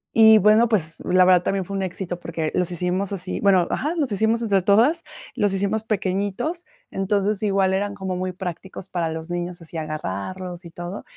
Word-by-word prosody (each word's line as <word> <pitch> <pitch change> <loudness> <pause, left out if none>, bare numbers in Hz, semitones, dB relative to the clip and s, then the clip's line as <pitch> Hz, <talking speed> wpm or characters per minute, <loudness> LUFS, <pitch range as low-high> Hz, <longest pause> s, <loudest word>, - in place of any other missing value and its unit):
y 220 -1 +8
bueno, 215 +3 +5
pues, 170 -8 0
la 185 0 +4
verdad 180 -1 +5
también 195 +1 -1
fue 200 - -6
un 195 - -1
éxito 180 -1 -4
porque 165 -2 -3
los 180 -2 0
hicimos 180 +3 -1
así, 185 -2 -3
bueno, 190 -3 +4
ajá, 305 +5 -1
los 285 -7 0
hicimos 220 +3 +1
entre 200 -4 +2
todas. 235 - +3 0.3
Los 205 -5 +1
hicimos 200 +3 0
pequeñitos. 205 - -2 0.3
Entonces 200 +1 0
igual 195 -2 +2
eran 200 +1 -1
como 190 -2 -4
muy 185 0 -2
prácticos 185 +1 -7
para 170 -2 -1
los 160 +2 -6
niños, 175 0 -4
así 165 - -14
agarrarlos 160 - -5
y - - -8
todo. 175 +4 -7
190 Hz, 190 wpm, -23 LUFS, 175-205 Hz, 0.3 s, y